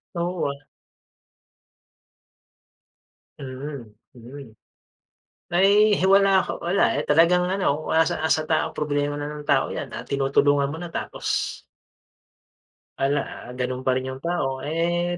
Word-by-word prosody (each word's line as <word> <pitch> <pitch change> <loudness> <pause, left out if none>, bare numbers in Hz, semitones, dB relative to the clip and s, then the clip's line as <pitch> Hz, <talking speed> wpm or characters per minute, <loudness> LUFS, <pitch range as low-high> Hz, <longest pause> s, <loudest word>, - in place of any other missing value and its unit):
Oo 175 +1 -2
ah. 140 +1 -8 2.8
Mm, 135 -2 -7 0.2
mm. 125 0 -12 1.0
Na, 175 - +1
eh, 210 0 +5
hi 190 - +4
wala 195 0 +5 0.2
ako, - - -5
wala, 175 +3 +2
eh, 145 - 0
talagang 170 +4 +4
ano, 170 -6 -1
ah, 160 0 +4
nasa - - -2
nasa 155 -1 +1
tao 160 0 +1
problema 145 -1 -2
na 145 - -4
ng 150 0 -7
tao - - +2
yan, - - -5
ah, - - -7
tinutulungan 140 +1 +2
mo 160 - -6
na 175 -1 -8
tapos - - -5 1.7
Wala, 140 +2 +1
ah, - - -11
ganun 125 0 -2
pa 130 - +3
rin 130 - -2
yung 130 +1 -7
tao, 135 -7 -1
eh, 175 +2 -1
150 Hz, 140 wpm, -24 LUFS, 140-175 Hz, 2.8 s, eh